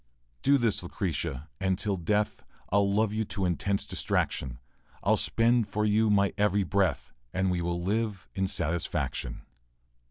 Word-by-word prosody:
Do 140 +1 +5
this, 115 -5 +1
Lucretia, 85 -5 -3
and 95 -2 +1
till 100 0 0
death 105 +4 0 0.3
I'll 100 0 +3
love 105 +1 +2
you 110 +1 0
to 100 -2 -2
intense 100 +3 0
distraction; 65 -2 -1 0.5
I'll - - +4
spend 115 -1 +2
for 105 0 -1
you 110 +1 +3
my 100 -1 +3
every 105 -1 +3
breath, 95 0 0 0.2
And 95 0 +2
we 90 -1 0
will 85 0 -2
live 105 0 -1
in 95 0 0
satisfaction. 80 -8 -2
100 Hz, 150 wpm, -29 LUFS, 90-105 Hz, 0.5 s, Do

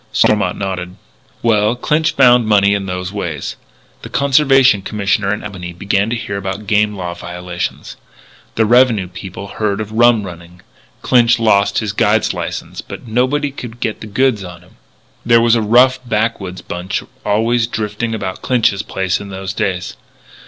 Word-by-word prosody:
Stormont 100 -4 +2
nodded. 95 -2 -4 0.5
"Well, 110 0 +2
Clinch 150 +5 0
found 125 -3 +5
money 100 -1 +4
in 100 -1 -2
those 90 0 -4
ways. 85 -7 -4 0.5
The - - -9
Conservation 135 -4 +4
Commissioner 100 0 -1
in 105 - -3
Albany 90 -4 -7
began 100 +3 0
to 120 - -1
hear 115 -4 -4
about 100 +1 -5
game 105 0 +1
law 90 -3 -4
violations. 90 0 -6 0.6
The 110 - +3
Revenue 115 -4 +4
people 95 +2 -8
heard 100 -1 -2
of 105 -1 -5
rum 115 -1 +4
running. 90 -1 -11 0.4
Clinch 120 -2 +4
lost 100 -3 +2
his 105 -2 -1
guide's - - +2
license. - - -5
But - - -10
nobody 130 +6 0
could 120 -3 -9
get 110 - -3
the 110 - -7
goods 115 -1 +1
on 90 -2 -10
him. 90 - -23 0.5
"There 115 0 +5
was 115 0 +3
a 115 - +3
rough 125 +4 +4
backwoods 105 -5 -2
bunch 90 +2 -4 0.2
always 115 +3 +1
drifting 110 +1 -3
about 95 -3 -5
Clinch's 115 -5 +1
place 95 -2 -2
in 100 - -8
those 95 0 -5
days. 90 -3 -3
105 Hz, 160 wpm, -16 LUFS, 95-115 Hz, 0.6 s, found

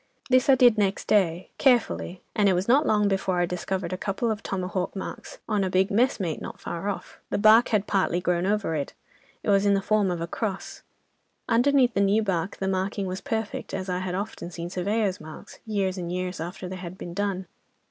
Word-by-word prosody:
This 255 +1 +4
I 270 - +8
did 245 -4 +5
next 195 -1 0
day, 185 -4 +2
carefully, 240 -8 +2
and 205 -2 +4
it - - +4
was 180 +2 -1
not 275 +6 +4
long 210 -1 +3
before 195 -2 0
I 175 - +3
discovered 180 0 -3
a 185 - -4
couple 210 +3 -1
of 210 - -3
tomahawk 185 0 -3
marks 190 - -7
on 210 -3 +1
a 190 - 0
big 190 +1 +2
'mess 240 +6 +2
mate' 170 -5 -2
not - - -7
far 170 +4 -4
off. 200 - -6
The - - 0
bark 220 +3 +6
had 210 -3 +1
partly 185 -3 +1
grown 180 0 0
over 205 -5 0
it. 145 -3 -3 0.5
It 210 - +1
was 195 0 +4
in 200 - +4
the - - +2
form 205 0 +2
of 175 -2 -2
a 165 - -2
cross. 195 +3 -4 0.7
Underneath 250 0 +4
the 200 - +1
new 200 +3 +3
bark 190 -1 -2
the 190 - -2
marking 195 +1 -1
was 185 0 -4
perfect, 225 -6 -3
as 190 0 -4
I 180 0 -1
had 185 -1 -3
often 195 -3 -5
seen 170 0 -6
surveyors' 195 +1 -1
marks, 155 0 -11
years 195 -3 -1
and 175 -1 -4
years 180 -1 -3
after 180 +3 -5
they 185 +1 -6
had 180 0 -8
been 175 - -7
done. 195 -1 -2
195 Hz, 220 wpm, -26 LUFS, 180-210 Hz, 0.7 s, I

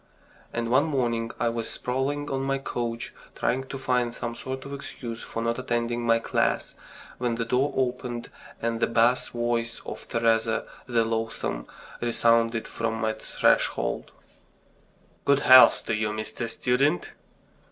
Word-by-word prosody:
And 115 0 -2
one 135 +4 +5
morning 120 -6 0
I 120 - +2
was 115 -1 -3
sprawling 135 +3 -2
on 135 0 -1
my 135 0 0
couch, 120 -3 -4 0.2
trying 130 +3 0
to 135 - -5
find 125 -3 0
some 120 - -4
sort 130 +2 -6
of 140 - -7
excuse 120 -4 -6
for 115 - -4
not 115 +1 0
attending 120 -1 -1
my 115 -1 +4
class, 115 - 0 0.5
when 120 -2 0
the 115 0 -2
door 130 +5 +1
opened, 125 -2 -2 0.3
and 115 0 -1
the - - +2
bass 115 +2 +3
voice 120 -1 -1
of - - -7
Teresa 115 -1 +1 0.2
the 115 -2 +2
loathsome 115 - -2 0.3
resounded 115 -1 +2
from 115 -1 -2
my 110 -1 0
threshold: 110 - +1 1.1
"Good 140 0 +3
health 130 0 +8
to - - -1
you, 110 0 0
Mr. 110 +2 -4
Student!" 125 -4 +1
120 Hz, 145 wpm, -26 LUFS, 115-130 Hz, 1.1 s, health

